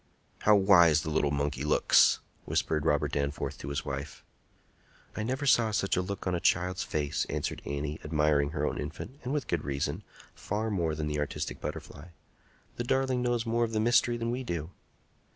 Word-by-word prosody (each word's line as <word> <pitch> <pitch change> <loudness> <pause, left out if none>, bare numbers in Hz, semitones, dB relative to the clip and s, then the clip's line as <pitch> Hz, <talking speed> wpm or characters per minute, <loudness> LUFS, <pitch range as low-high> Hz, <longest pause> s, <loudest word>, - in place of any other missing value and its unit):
"How 105 - +5
wise 85 -6 +6
the 80 - -3
little 75 -2 +2
monkey 70 -1 -1
looks!" 75 - +4 0.2
whispered 80 0 0
Robert 75 -1 +2
Danforth 70 0 -2
to - - -7
his 70 +1 -3
wife. 70 0 -6 0.9
"I - - -3
never 130 +6 -2
saw 120 -5 +4
such 105 -2 0
a 90 - +1
look 95 +1 -5
on 90 - 0
a 85 - 0
child's 90 +2 +1
face," 75 -1 -1
answered - - -3
Annie, 70 +2 -3
admiring 75 -2 +2
her 75 -1 -2
own - - -2
infant, 135 +6 -7
and 125 - -3
with 145 -1 -1
good 85 -3 -1
reason, 70 +5 -2 0.3
far 110 +2 -3
more 85 -6 0
than 75 0 -3
the 75 -1 -2
artistic 75 - -3
butterfly. 75 0 -7 0.7
"The 120 - -1
darling 130 0 +1
knows 120 -1 0
more 115 +1 +1
of 115 -1 -2
the 110 - +1
mystery 120 +1 +3
than 115 0 -2
we 125 +2 -3
do." 85 -7 -4
85 Hz, 190 wpm, -29 LUFS, 75-110 Hz, 0.9 s, wise